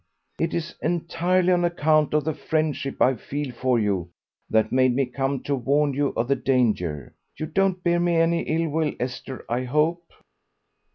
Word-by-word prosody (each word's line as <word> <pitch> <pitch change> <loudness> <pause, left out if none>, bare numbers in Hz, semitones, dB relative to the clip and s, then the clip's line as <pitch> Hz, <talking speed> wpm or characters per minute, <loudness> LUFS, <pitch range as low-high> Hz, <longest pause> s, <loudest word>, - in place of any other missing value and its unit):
"It 165 0 0
is 170 0 -3
entirely 175 +2 +1
on 175 0 +2
account 155 -3 +2
of 150 - +2
the 160 +2 -1
friendship 155 -3 -2
I 130 - +4
feel 140 +3 -5
for 125 +1 +1
you 100 -6 0 0.4
that 110 0 +2
made 130 -1 +3
me 135 0 +2
come 135 +1 -2
to 145 - -1
warn 140 +3 +1
you 145 +1 +1
of 115 - 0
the 140 - +2
danger. 110 - 0 0.2
You 155 - -3
don't 190 +1 0
bear 175 0 +2
me 175 0 +1
any 165 +1 +2
ill 165 +1 -1
will, 155 -1 0
Esther, 125 +1 -5
I 125 +2 -1
hope?" 160 +6 0
145 Hz, 175 wpm, -24 LUFS, 125-165 Hz, 0.4 s, I